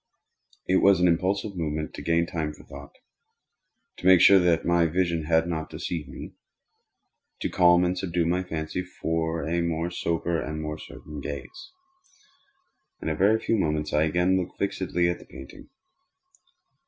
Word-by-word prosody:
It 95 - +3
was 100 -2 +5
an 90 - +4
impulsive 95 +4 0
movement 80 -2 -3
to - - -7
gain 85 +3 +1
time 80 -3 -3
for - - -15
thought—to 70 +4 -17
make 95 -1 +8
sure 95 +2 +7
that 85 -2 +2
my 85 -1 +3
vision 85 -1 0
had 80 +1 +2
not 80 -2 -3
deceived 80 -4 -5
me—to - - -12
calm 90 0 +4
and 90 +1 0
subdue 90 -2 -1
my 90 +2 +1
fancy 80 -1 -4
for 80 -3 -3
a 85 +1 0
more 85 0 -2
sober 85 -1 -1
and 75 +1 -5
more 75 0 -5
certain 75 -1 -10
gaze. 365 - -8 1.3
In - - -3
a 80 - -1
very 100 +6 +4
few 115 - 0
moments 75 -3 -1
I 75 +1 +3
again 90 +4 +2
looked 90 -1 -4
fixedly 95 -3 0
at 85 0 -1
the - - -14
painting. 65 0 -12
85 Hz, 155 wpm, -26 LUFS, 80-90 Hz, 1.3 s, make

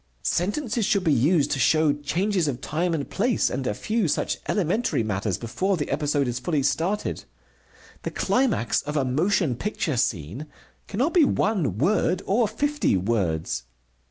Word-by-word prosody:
Sentences 220 - 0
should 200 -2 +2
be 160 -4 +3
used 145 +4 +3
to 135 - 0
show 155 +3 +4
changes 170 +5 0
of 130 -4 -2
time 165 +5 -1
and 145 - -3
place 230 +3 +1
and 130 0 -2
a - - 0
few 215 - 0
such - - -1
elementary 200 - 0
matters 100 -2 -1
before 185 - -1
the 150 - -3
episode 145 -2 +1
is 120 0 -2
fully 145 +1 0
started. 180 +9 -1 0.8
The - - -3
climax 250 - +1
of 150 +1 -4
a 135 - +1
motion 155 +1 +1
picture 155 - -2
scene 105 - -2 0.4
cannot 255 +11 0
be 345 - +6
one 190 - +1
word 185 - +1
or 220 +3 +2
fifty 285 - 0
words. 90 - -1
155 Hz, 155 wpm, -25 LUFS, 125-205 Hz, 0.8 s, be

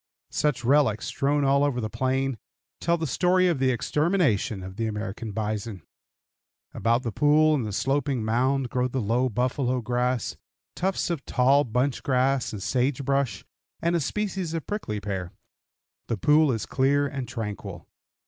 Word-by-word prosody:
Such 145 -4 0
relics, 130 -5 +3
strewn 145 +1 0
all 140 +1 +3
over 140 -4 +1
the 110 - -2
plain, 130 +1 -1 0.4
tell 170 +1 +1
the 165 - -2
story 180 +6 +3
of 170 -6 +1
the 130 0 +3
extermination 130 - +1
of 95 0 -8
the 115 +2 -1
American 110 +1 -4
bison. 105 -2 -4 0.9
About 115 +2 +1
the 115 - -2
pool 150 +5 +4
and 130 -7 0
the - - -4
sloping 135 +1 0
mound 130 +3 +1
grow 125 0 +1
the 130 +1 -3
low 120 +4 +1
buffalo 125 +2 0
grass, 125 0 -1 0.4
tufts 190 -1 -1
of 165 -5 -3
tall 135 +3 +4
bunch 125 +3 0
grass 130 0 +1
and 100 -3 -6
sage 130 +5 0
brush, 140 -2 0 0.3
and 170 +1 +1
a - - +2
species 190 +1 -2
of 165 - -4
prickly 155 - -3
pear. 95 -4 -4 0.7
The 115 - -1
pool 150 +5 +4
is 115 -3 -2
clear 140 +2 +2
and 135 -2 -4
tranquil. 110 -4 -6
130 Hz, 160 wpm, -26 LUFS, 115-145 Hz, 0.9 s, pool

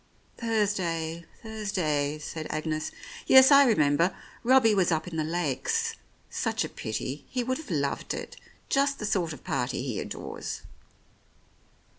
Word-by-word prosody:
"Thursday, 180 -8 -1 0.2
Thursday," 180 -10 -1
said 155 +1 -6
Agnes. 155 0 -2 0.4
"Yes, 265 +1 +8
I 280 0 +9
remember: 165 -4 +3 0.3
Robbie 240 -3 +5
was 185 -3 +3
up 160 +1 0
in 175 - -6
the 155 - 0
Lakes. 155 -5 -1 0.3
Such - - -1
a - - -6
pity! 130 +6 -4
He 250 -1 -1
would 255 +3 -1
have 320 - -10
loved 140 -5 -1
it, - - -7 0.3
just 280 0 +2
the 210 - -4
sort 180 -6 0
of 150 - -9
party - - -1
he - - -3
adores." - - -6
175 Hz, 140 wpm, -28 LUFS, 155-225 Hz, 0.4 s, I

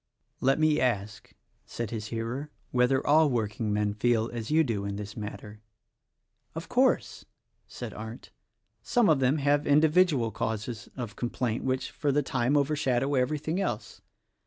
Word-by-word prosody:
"Let 135 +1 +3
me 155 -1 +3
ask," 110 -3 -2 0.3
said 115 -3 -5
his 110 -2 -4
hearer, 115 +6 -4 0.2
"whether 125 +2 +2
all 155 +1 +5
work 110 -4 -1
ingmen 105 -2 0
feel 115 0 +1
as 115 -2 -5
you 160 +1 +4
do 115 -8 -2
in 100 0 -3
this 100 0 -7
matter?" 105 0 -8 0.9
"Of - - -6
course," - - +1 0.4
said - - -7
Arndt, 110 +2 -9 0.5
"some 240 -6 +2
of 155 -4 +4
them 135 +3 +2
have 145 +1 +1
indi 150 +2 +5
vidual 150 - +3
causes 110 +2 -4
of 120 -5 -5
complaint, 120 -1 -2
which, 130 0 -1
for 145 -2 -1
the 145 +1 +2
time, 130 +2 +1
over 145 +1 +1
shadow 135 -1 0
everything 150 +6 0
else. 120 - -4
125 Hz, 160 wpm, -28 LUFS, 110-145 Hz, 0.9 s, all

